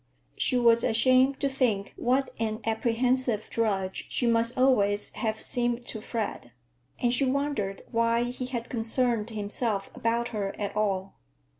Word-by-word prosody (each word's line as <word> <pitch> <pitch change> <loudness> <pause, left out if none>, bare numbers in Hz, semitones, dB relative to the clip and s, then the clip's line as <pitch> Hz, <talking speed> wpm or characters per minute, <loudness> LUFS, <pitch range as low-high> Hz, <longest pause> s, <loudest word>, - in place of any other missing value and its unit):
She 255 - +2
was 235 -1 +4
ashamed 255 +4 +3
to 280 - +2
think 245 -7 -1
what 260 +3 0
an 220 0 -2
apprehensive 235 0 +1
drudge 195 -4 -1
she 245 - +1
must 230 +1 +1
always 205 -6 +2
have 220 -2 -3
seemed 240 0 +1
to 220 - -5
Fred, 210 - -4 0.5
and 240 -1 +1
she 260 - +2
wondered 265 -7 -1
why 230 0 +2
he 250 +1 -4
had 240 -2 -4
concerned 230 -1 0
himself 210 -1 -3
about 235 +1 -1
her 200 -4 -3
at 205 -1 -3
all. 195 -2 -1
230 Hz, 145 wpm, -27 LUFS, 215-250 Hz, 0.5 s, was